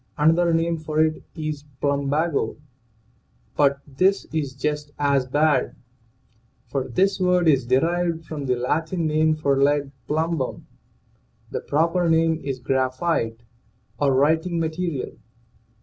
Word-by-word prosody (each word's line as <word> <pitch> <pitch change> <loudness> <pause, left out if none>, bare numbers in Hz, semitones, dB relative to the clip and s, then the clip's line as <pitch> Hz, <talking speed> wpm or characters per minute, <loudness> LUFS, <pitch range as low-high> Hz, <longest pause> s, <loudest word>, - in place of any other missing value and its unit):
Another 165 +3 +3
name 165 0 +1
for 155 0 -3
it 155 0 +2
is 155 -3 -4 0.2
plumbago, 140 -1 0 1.0
but 140 -1 +2
this 185 +8 +1
is 145 -4 -2
just 150 +1 -3
as 140 -3 +1
bad, 145 0 +2 0.9
for 130 +2 -3
this 195 +2 +1
word 180 -2 +2
is 135 -5 +3
derived 165 +5 +1
from 145 -4 -5
the 125 - +2
Latin 160 +7 -1
name 155 0 +2
for 140 -3 +1
lead 145 0 +2 0.2
(plumbum).. 160 -3 -1 0.9
The - - -3
proper 165 +4 +1
name 160 0 +2
is 135 -2 -3
graphite, 130 -2 -1 0.6
or 140 -2 +2
writing 160 +5 +2
"material. 165 -3 -3
155 Hz, 120 wpm, -23 LUFS, 140-165 Hz, 1.0 s, Another